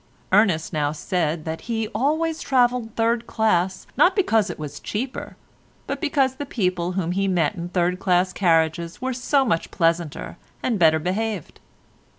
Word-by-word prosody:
Ernest 185 Hz, -5 st, +3 dB
now 145 Hz, -1 st, 0 dB
said 160 Hz, 0 st, -2 dB
that 160 Hz, 0 st, -4 dB
he 225 Hz, -1 st, -1 dB
always 315 Hz, +4 st, 0 dB
travelled 245 Hz, -3 st, +1 dB
third 230 Hz, +1 st, +1 dB
class 190 Hz, -4 st, +1 dB
not 370 Hz, +1 st, +4 dB
because 225 Hz, -, +2 dB
it -, -, -5 dB
was 150 Hz, -1 st, -7 dB
cheaper, 250 Hz, +5 st, -5 dB, 0.5 s
but -, -, -4 dB
because 275 Hz, -4 st, +1 dB
the 285 Hz, -, -4 dB
people 180 Hz, -6 st, -1 dB
whom 180 Hz, -2 st, -1 dB
he 195 Hz, +2 st, 0 dB
met 175 Hz, -5 st, +1 dB
in 175 Hz, 0 st, -6 dB
third 180 Hz, 0 st, 0 dB
class 185 Hz, -1 st, +2 dB
carriages 165 Hz, -2 st, +1 dB
were 260 Hz, +1 st, -2 dB
so 265 Hz, +3 st, +1 dB
much 210 Hz, -9 st, 0 dB
pleasanter 165 Hz, -2 st, -1 dB, 0.3 s
and 230 Hz, -5 st, 0 dB
better 160 Hz, -2 st, +5 dB
behaved. 190 Hz, +3 st, -3 dB
190 Hz, 160 wpm, -23 LUFS, 170-240 Hz, 0.5 s, better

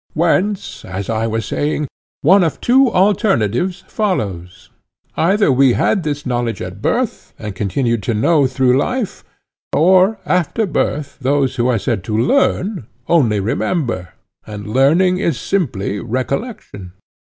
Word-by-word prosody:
Whence, 185 Hz, +5 st, 0 dB
as 95 Hz, +3 st, -5 dB
I 115 Hz, 0 st, -1 dB
was 110 Hz, 0 st, -2 dB
saying, 150 Hz, 0 st, -2 dB, 0.4 s
one 185 Hz, +6 st, +6 dB
of 160 Hz, -, -1 dB
two 260 Hz, +1 st, +4 dB
alternatives 185 Hz, -, +1 dB
follows:—either 110 Hz, -, -2 dB
we 130 Hz, -1 st, +4 dB
had 195 Hz, -, +1 dB
this 145 Hz, -3 st, -4 dB
knowledge 120 Hz, -2 st, -2 dB
at 95 Hz, +2 st, -7 dB
birth, 245 Hz, -, -2 dB
and 105 Hz, -2 st, -6 dB
continued 115 Hz, +4 st, -1 dB
to 115 Hz, -, +1 dB
know 145 Hz, +5 st, +3 dB
through 130 Hz, 0 st, +2 dB
life; 250 Hz, -, -3 dB, 0.5 s
or, 185 Hz, +6 st, +4 dB
after 180 Hz, +5 st, 0 dB
birth, 150 Hz, -5 st, -2 dB
those 135 Hz, 0 st, 0 dB
who 120 Hz, 0 st, +1 dB
are 125 Hz, -2 st, +2 dB
said 110 Hz, -3 st, -2 dB
to 105 Hz, -, -2 dB
learn 190 Hz, -, +1 dB, 0.2 s
only 120 Hz, -11 st, +3 dB
remember, 115 Hz, -, -2 dB, 0.3 s
and 105 Hz, -1 st, -7 dB
learning 170 Hz, +8 st, +3 dB
is 165 Hz, -9 st, -1 dB
simply 110 Hz, -, -2 dB
recollection. 130 Hz, -, -4 dB
140 Hz, 130 wpm, -17 LUFS, 110-185 Hz, 0.5 s, one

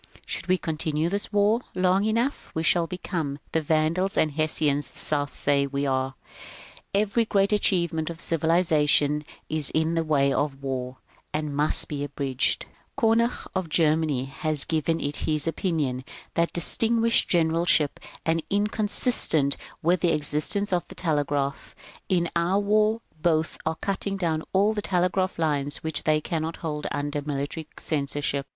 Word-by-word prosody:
Should 170 Hz, -, -4 dB
we 185 Hz, 0 st, +3 dB
continue 160 Hz, -1 st, -1 dB
this 200 Hz, +2 st, -2 dB
war 210 Hz, +3 st, +3 dB
long 185 Hz, +2 st, +2 dB
enough, 230 Hz, +6 st, -1 dB
we 160 Hz, -, -1 dB
shall 170 Hz, 0 st, +3 dB
become 165 Hz, -5 st, -3 dB
the 160 Hz, -, +1 dB
Vandals 160 Hz, +5 st, +1 dB
and 155 Hz, -, +3 dB
Hessians 150 Hz, -1 st, 0 dB
the -, -, -20 dB
South 145 Hz, -1 st, -1 dB
says 140 Hz, -1 st, +1 dB
we 140 Hz, 0 st, -1 dB
are. 130 Hz, 0 st, -1 dB, 0.8 s
Every 210 Hz, +3 st, +2 dB
great 200 Hz, -2 st, +2 dB
achievement 170 Hz, -6 st, +1 dB
of 170 Hz, -1 st, -7 dB
civilization 155 Hz, -3 st, +2 dB, 0.2 s
i^ 155 Hz, -2 st, -1 dB
in 160 Hz, +1 st, +2 dB
the 165 Hz, -1 st, +1 dB
way 140 Hz, -3 st, +2 dB
of 140 Hz, -1 st, -2 dB
war, 130 Hz, -1 st, -3 dB, 0.4 s
and 150 Hz, -2 st, -2 dB
must 150 Hz, +2 st, +2 dB
be 145 Hz, -1 st, -4 dB
abridged. 140 Hz, -2 st, -1 dB, 0.3 s
Konig 230 Hz, -1 st, +2 dB
of 185 Hz, -3 st, -2 dB
Germany 155 Hz, -4 st, +2 dB
has 145 Hz, +2 st, -1 dB
given 160 Hz, +1 st, 0 dB
it 145 Hz, +1 st, -3 dB
as -, -, -3 dB
his 155 Hz, 0 st, 0 dB
opinion 155 Hz, -7 st, -1 dB, 0.3 s
that 170 Hz, 0 st, +1 dB
distinguished 230 Hz, +6 st, +2 dB
generalship 165 Hz, -3 st, +2 dB, 0.3 s
is 165 Hz, 0 st, +1 dB
inconsistent 205 Hz, -, +2 dB, 0.3 s
with 175 Hz, +3 st, +3 dB
the 175 Hz, -, +3 dB
existence 155 Hz, +7 st, +2 dB
of 175 Hz, -1 st, 0 dB
the -, -, -12 dB
telegraph. 145 Hz, -4 st, -1 dB, 0.3 s
In 175 Hz, -2 st, +2 dB
our 170 Hz, +4 st, +2 dB
war 215 Hz, +2 st, +2 dB, 0.2 s
both 160 Hz, -1 st, +2 dB
sides -, -, -12 dB
are 160 Hz, -, 0 dB
cutting 195 Hz, 0 st, -2 dB
down 165 Hz, -4 st, 0 dB
all 200 Hz, +3 st, +3 dB
telegraph 185 Hz, -2 st, 0 dB
lines 145 Hz, -3 st, -1 dB
which 160 Hz, -1 st, -3 dB
they 155 Hz, 0 st, +3 dB
cannot 160 Hz, +1 st, -3 dB
hold 150 Hz, -2 st, -3 dB
under 145 Hz, 0 st, -2 dB
military 145 Hz, +2 st, -4 dB
censorship. 140 Hz, -2 st, -2 dB
160 Hz, 150 wpm, -25 LUFS, 145-185 Hz, 0.8 s, we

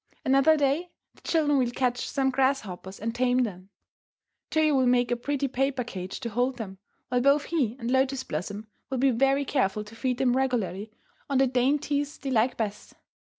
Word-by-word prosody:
Another 275 Hz, +4 st, +5 dB
day 290 Hz, +5 st, +1 dB, 0.2 s
the -, -, -23 dB
children 295 Hz, -4 st, +2 dB
will 250 Hz, -2 st, +1 dB
catch 245 Hz, 0 st, -1 dB
some 265 Hz, -1 st, +1 dB
grasshoppers 250 Hz, -8 st, -1 dB
and 230 Hz, +2 st, -3 dB
tame 250 Hz, +1 st, +2 dB
them. 190 Hz, -4 st, -6 dB, 0.8 s
Toyo 310 Hz, -1 st, +2 dB
will 260 Hz, -2 st, +3 dB
make 245 Hz, -1 st, +3 dB
a -, -, +3 dB
pretty 280 Hz, +3 st, -2 dB
paper 265 Hz, 0 st, -1 dB
cage 185 Hz, -5 st, -6 dB
to 235 Hz, -, -3 dB
hold 245 Hz, +3 st, 0 dB
them, 195 Hz, -5 st, -7 dB, 0.3 s
while 250 Hz, 0 st, +1 dB
both 280 Hz, +3 st, +4 dB
he 275 Hz, -10 st, -1 dB
and 235 Hz, -1 st, -3 dB
Lotus 265 Hz, 0 st, +1 dB
Blossom 200 Hz, +6 st, -5 dB, 0.2 s
will 265 Hz, -, -2 dB
be 265 Hz, +2 st, +3 dB
very 270 Hz, +3 st, +2 dB
careful 210 Hz, -7 st, 0 dB
to 210 Hz, +2 st, -13 dB
feed 250 Hz, +1 st, -1 dB
them 250 Hz, -1 st, +2 dB
regularly 220 Hz, -6 st, -1 dB, 0.4 s
on 275 Hz, -, +1 dB
the 270 Hz, -, +5 dB
dainties 285 Hz, +3 st, 0 dB
they 275 Hz, -, -5 dB
like 240 Hz, +1 st, +2 dB
best. 210 Hz, -2 st, -4 dB
255 Hz, 185 wpm, -27 LUFS, 230-275 Hz, 0.8 s, Another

